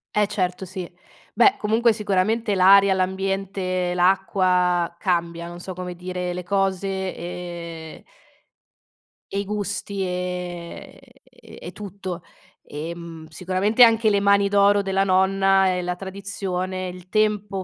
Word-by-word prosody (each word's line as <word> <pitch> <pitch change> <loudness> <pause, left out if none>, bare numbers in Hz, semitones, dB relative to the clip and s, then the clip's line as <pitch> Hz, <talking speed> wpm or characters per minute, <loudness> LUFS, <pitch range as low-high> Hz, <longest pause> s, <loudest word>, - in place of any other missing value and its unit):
Eh 210 -1 +3
certo 185 -3 -2
sì. 185 -1 -6 0.5
Beh 395 - +5
comunque 225 +2 +2
sicuramente 210 +1 0
l'aria, 195 +1 +6
l'ambiente, 190 -1 -1
l'acqua 180 -2 +2
cambia, 170 -3 -1
non 175 0 -9
so 185 +1 -7
come 180 0 -6
dire, 180 0 -4
le 180 - -5
cose 195 0 -1
e 170 -2 -7 1.3
i 200 0 -2
gusti, 200 -1 -3
ehm, 180 -1 -5 0.3
e - - -12
tutto. 190 -3 -7 0.4
Ehm, 165 +1 -7
sicuramente 185 +8 +2
anche 225 -1 +5
le 200 - +2
mani 200 0 +4
d'oro 200 0 +4
della 195 0 +1
nonna 195 0 +3
e 180 - -2
la 180 0 -3
tradizione, 190 -1 -4
il 180 0 -11
tempo 210 -2 0
190 Hz, 120 wpm, -23 LUFS, 180-200 Hz, 1.3 s, l'aria